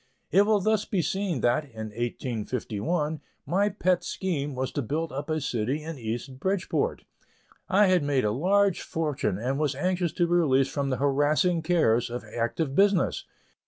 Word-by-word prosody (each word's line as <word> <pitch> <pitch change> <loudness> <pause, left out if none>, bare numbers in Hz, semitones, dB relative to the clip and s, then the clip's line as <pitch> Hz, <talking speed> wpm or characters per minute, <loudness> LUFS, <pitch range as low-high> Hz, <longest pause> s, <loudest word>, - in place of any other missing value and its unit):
It 200 +2 +5
will 215 -1 +4
thus 215 +1 +1
be 190 -5 -1
seen 185 - -1
that, 120 +5 +2
in 110 -6 -8
1851, 120 - -2 0.2
my 200 +4 +2
pet 185 -3 +1
scheme 150 -6 -3
was 130 0 -2
to 145 - -2
build 155 +7 -2
up 140 +3 -5
a 155 0 0
city 130 +2 -2
in 160 -3 -6
East 120 +4 -5
Bridgeport. 195 - -1 0.7
I 205 +1 +5
had 185 -2 +3
made 140 -4 +1
a 105 - +2
large 190 - +2
fortune 145 - -2
and 130 +6 -2
was 145 -3 0
anxious 180 +3 0
to 175 - +2
be 170 - -1
released 135 -6 +3
from 140 -2 -1
the 130 - 0
harassing 145 +5 +2
cares 130 -9 +2
of 120 +1 -5
active 120 +5 -2
business. 195 +2 +2
150 Hz, 170 wpm, -27 LUFS, 130-180 Hz, 0.7 s, It